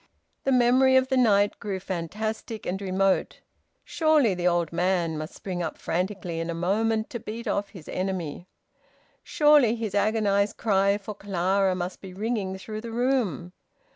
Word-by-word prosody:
The 270 - +2
memory 255 +1 +4
of 260 0 +4
the 265 - +1
night 205 -5 +3
grew 195 -2 -3
fantastic 210 +5 -4
and 190 +2 -3
remote. 195 0 0 0.4
Surely 310 - +3
the 180 0 -1
old 170 -2 +1
man 175 -2 +1
must 155 +1 -6
spring 180 -2 -5
up 165 - -4
frantically 180 -1 -3
in 165 +1 -3
a 170 - -2
moment, 220 +6 0
to 235 - -4
beat 225 +2 -7
off 200 0 -1
his 180 -8 -13
enemy! 185 -3 -4 0.7
Surely 295 -7 +4
his 225 -4 -4
agonised 205 -1 +1
cry 200 -2 +2
for 210 +1 -7
Clara 195 -1 0
must 180 0 -5
be 185 -2 -10
ringing 205 -2 -2
through 215 +2 -7
the 235 - -7
room! 230 - -1
200 Hz, 160 wpm, -26 LUFS, 180-225 Hz, 0.7 s, memory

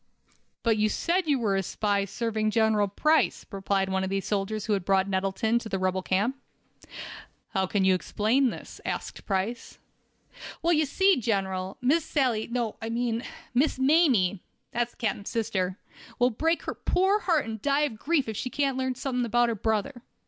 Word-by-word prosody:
"But 225 -2 +3
you 215 0 +2
said 350 - 0
you 290 -2 +3
were 215 -5 0
a 195 - +2
spy, 200 +1 0
serving 215 +1 -1
General 215 -1 +2
Price," 305 +11 +2
replied 195 -1 0
one 190 0 0
of 190 - -2
the 195 0 0
soldiers 205 +1 -2
who 215 - +1
had 195 -3 0
brought 190 +1 +2
Nettleton 195 +4 0
to 230 - -8
the 195 - -1
rebel 185 0 0
camp. 200 +8 0 1.1
"How 190 -3 0
can 195 0 +1
you 190 - +5
explain 220 +8 +1
this?" - - -9
asked - - -5
Price. 200 +4 -2 0.9
"Well, 340 +1 +4
ye 310 -1 +3
see, 380 +6 +3
General, 190 -5 -1
Miss 290 +6 +3
Sally—no, 240 -5 -1
I 225 - -4
mean 230 0 -1 0.3
Miss 265 +4 +2
Mamie—that's 240 - +1
the - - -30
captain's 205 -3 -2
sister—will 220 +2 -2
break 325 +8 0
her - - -3
poor 385 +3 +2
heart 335 -8 +1
and 220 -2 -6
die 285 +1 +2
of 245 -8 -1
grief 300 -4 +1
if 220 - -4
she 255 - -3
can't 275 -1 0
learn 260 -1 -1
something 250 -1 -2
about 240 +1 +2
her - - 0
brother. 220 +5 -1
225 Hz, 175 wpm, -27 LUFS, 195-265 Hz, 1.1 s, you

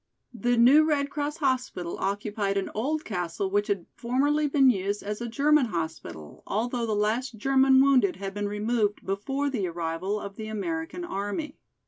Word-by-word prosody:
The 240 +2 0
new 265 +7 +7
Red 285 -2 0
Cross 295 +1 -3
hospital 255 - -1
occupied 200 0 -1
an 195 - -2
old 300 +8 -2
castle 180 -1 -3
which 205 +1 +1
had 200 -5 -1
formerly 290 +5 +1
been 275 -2 +5
used 200 -1 -2
as 210 +2 -4
a 240 - -3
German 285 +2 +3
hospital, 160 - -6
although 235 +2 -1
the 215 - 0
last 220 +4 -1
German 265 +3 +4
wounded 260 -9 +4
had 195 +1 -6
been 205 0 -2
removed 210 0 -1
before 270 +9 -2
the 205 -8 -1
arrival 170 +4 -3
of 200 -1 -8
the 220 - -6
American 325 - -4
army. 205 - -4
220 Hz, 165 wpm, -27 LUFS, 200-270 Hz, -, new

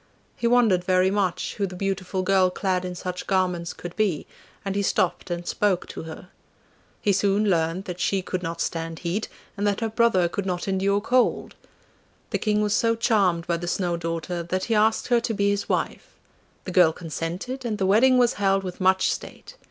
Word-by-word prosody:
He 235 - -1
wondered 230 -7 +4
very 185 +1 +3
much 195 -3 -1
who 200 -2 0
the 180 - -8
beautiful 190 0 -2
girl 190 -1 +3
clad 185 0 -1
in 180 0 -5
such 180 0 -5
garments 180 -3 0
could 175 0 -9
be, 200 -8 0 0.4
and 195 - -1
he 200 - +1
stopped 180 -2 0
and 175 0 -4
spoke 200 -4 0
to - - -6
her. 165 +2 -9 0.7
He 205 - +2
soon 200 +2 +2
learnt 165 +2 0
that 180 -1 -6
she 190 +1 0
could 185 0 -3
not 170 -1 -4
stand 165 0 -3
heat, 190 +6 -1 0.3
and 205 0 -1
that 200 -1 0
her 225 - 0
brother 220 -6 +3
could 195 +3 -4
not 180 0 -2
endure 195 +1 +1
cold. 250 +3 +1 0.8
The - - 0
King 210 -1 +1
was 210 -1 +1
so 230 +1 +2
charmed 195 -8 +2
by 170 -1 0
the 175 +1 -6
Snow 175 -1 0
daughter, 165 +1 -3
that 185 +2 -2
he 230 - -1
asked 220 +2 +2
her 240 -1 +4
to 230 -1 -2
be 200 0 +2
his 200 0 -2
wife. - - -2 0.5
The 185 - -6
girl 175 -3 +5
consented, 175 - -5
and 225 -3 -2
the 195 - 0
wedding 245 +7 +5
was 245 -1 +4
held 195 0 +2
with 185 0 -6
much 190 0 +3
state. - - -8
190 Hz, 200 wpm, -24 LUFS, 175-210 Hz, 0.8 s, girl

